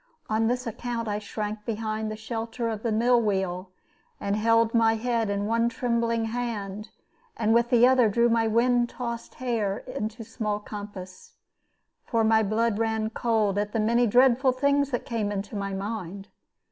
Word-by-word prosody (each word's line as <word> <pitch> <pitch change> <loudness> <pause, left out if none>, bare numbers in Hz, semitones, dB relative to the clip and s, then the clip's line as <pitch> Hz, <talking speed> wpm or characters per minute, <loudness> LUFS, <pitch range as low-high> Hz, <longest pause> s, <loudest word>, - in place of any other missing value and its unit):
On 220 +1 +2
this 250 +2 -1
account 230 0 -4
I 210 0 -1
shrank 210 0 -5
behind 215 -1 -3
the 215 - -4
shelter 225 +1 -4
of 220 -2 -4
the 230 - -1
mill 235 +2 +3
wheel, 190 -3 -1 0.5
and 200 0 -1
held 230 +1 +3
my 225 -1 +4
head 230 -1 -1
in 200 0 -1
one 230 +2 +2
trembling 230 -1 0
hand, 220 -3 -4 0.5
and 220 0 +2
with 235 +1 +3
the 245 -1 +6
other 255 -3 +4
drew 235 +3 +3
my 230 -1 +2
wind 240 +2 +2
tossed 235 -2 -6
hair 225 -6 -1
into 220 +2 -5
small 215 -2 -3
compass. 205 -3 -9 0.7
For 230 -2 0
my 220 0 +4
blood 220 +1 0
ran 220 -1 0
cold 220 -4 +1
at 210 0 -2
the 225 - 0
many 235 +3 +3
dreadful 255 +3 +4
things 280 +1 +2
that 245 -3 -3
came 220 -3 -2
into 200 +1 -4
my 200 -1 -3
mind. 195 -1 -5
225 Hz, 170 wpm, -26 LUFS, 210-235 Hz, 0.7 s, the